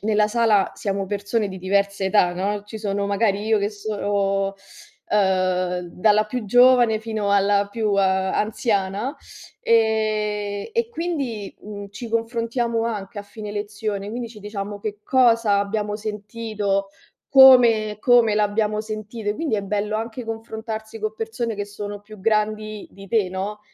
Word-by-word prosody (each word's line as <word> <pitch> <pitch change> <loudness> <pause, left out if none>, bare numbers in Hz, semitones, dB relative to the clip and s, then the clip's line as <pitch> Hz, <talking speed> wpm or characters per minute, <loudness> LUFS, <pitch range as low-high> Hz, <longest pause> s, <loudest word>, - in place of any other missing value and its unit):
nella 210 0 +2
sala 220 -3 +3
siamo 195 -1 -2
persone 205 +2 -1
di 190 -1 -7
diversa 200 +1 0
età, 190 -2 +3
no: 200 +3 -2
ci 220 +1 -8
sono 200 -1 -2
magari 200 0 +1
io 220 0 +3
che 200 0 0
sono 200 -2 -1 0.5
ehm, 185 -3 +1
dalla 210 +4 +3
più 225 +1 -5
giovane 245 0 +5
fino 220 -2 -2
alla 200 0 +3
più 215 -2 0
anziana; 195 +4 0 0.5
ehm, 215 -2 +1
e 465 -1 +1
quindi, 280 - -3
uhm, 205 -1 -8
ci 235 +4 -7
confrontiamo 230 0 -1
anche 210 -3 -4
a - - -5
fine 210 +1 -8
lezione, 205 -1 -4
quindi 235 +2 -4
ci 225 -1 -13
diciamo 205 0 -5
che 205 0 -5
cosa 230 -5 +4
abbiamo 210 +1 -2
sentito, 210 -2 -3 0.4
come 240 -6 +7
come 240 -3 +5
l'abbiamo 210 0 +1
sentito. 215 0 -4
Quindi 295 -7 -1
è 200 - -2
bello 210 +2 -1
anche 230 +2 -5
confrontarsi 220 0 -6
con 215 0 -2
persone 225 +1 -3
che 205 0 -3
sono 205 0 -7
più 215 +1 -13
grandi 215 0 -1
di 195 0 -13
te, 215 -4 +2
no, 195 +3 -4
210 Hz, 145 wpm, -22 LUFS, 200-225 Hz, 0.5 s, come